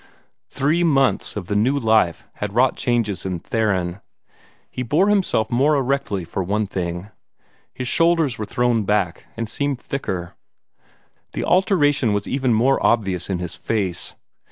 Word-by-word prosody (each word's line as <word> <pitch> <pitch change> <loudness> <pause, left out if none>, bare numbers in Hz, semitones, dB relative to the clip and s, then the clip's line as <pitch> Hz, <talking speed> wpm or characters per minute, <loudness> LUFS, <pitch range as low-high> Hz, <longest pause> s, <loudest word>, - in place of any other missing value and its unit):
Three 150 +6 +1
months 135 -5 +2
of 100 -3 -4
the 105 - -3
new 125 +7 +2
life 110 -9 +2
had 105 -1 -4
wrought 125 +2 +3
changes 115 -5 0
in 95 -2 -2
Theron. 95 -2 -1 0.7
He - - -4
bore 155 - +2
himself 190 - +1
more 140 +5 +3
erectly, 135 -9 -1
for 95 - -3
one 105 +4 0
thing; 90 0 -4 0.6
his 125 - -5
shoulders 165 -5 +2
were 105 - -2
thrown 120 0 +1
back, 100 -4 0
and 115 - -2
seemed 140 +2 -2
thicker. 95 -12 -4 1.0
The - - -3
alteration 150 - +3
was 100 0 -1
even 130 -2 0
more 125 +5 +2
obvious 95 -6 +1
in 95 - 0
his 90 -1 -5
face. 95 -6 -3
115 Hz, 150 wpm, -21 LUFS, 95-140 Hz, 1.0 s, wrought